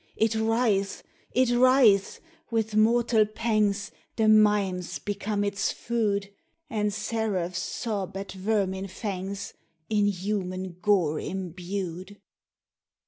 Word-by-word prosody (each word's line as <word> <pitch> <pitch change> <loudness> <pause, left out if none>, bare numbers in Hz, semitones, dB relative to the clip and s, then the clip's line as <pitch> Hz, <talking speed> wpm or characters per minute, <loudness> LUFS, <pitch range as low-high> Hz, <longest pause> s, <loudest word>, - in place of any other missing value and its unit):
It 220 0 +2
writhes!—it 225 +2 0
writhes!—with 240 - +2
mortal 225 +1 +4
pangsThe 215 0 -1
mimes 205 -4 +2
become 205 0 -2
its 200 -1 0
food, 200 -4 -1 0.4
And 210 -1 0
seraphs 210 -4 -2
sob 200 -4 -3
at 195 0 -6
vermin 195 -1 -1
fangsIn 195 0 -5 0.6
human 185 -2 -3
gore 180 -8 +2
imbued. 185 +1 -5
205 Hz, 85 wpm, -27 LUFS, 190-220 Hz, 0.6 s, mortal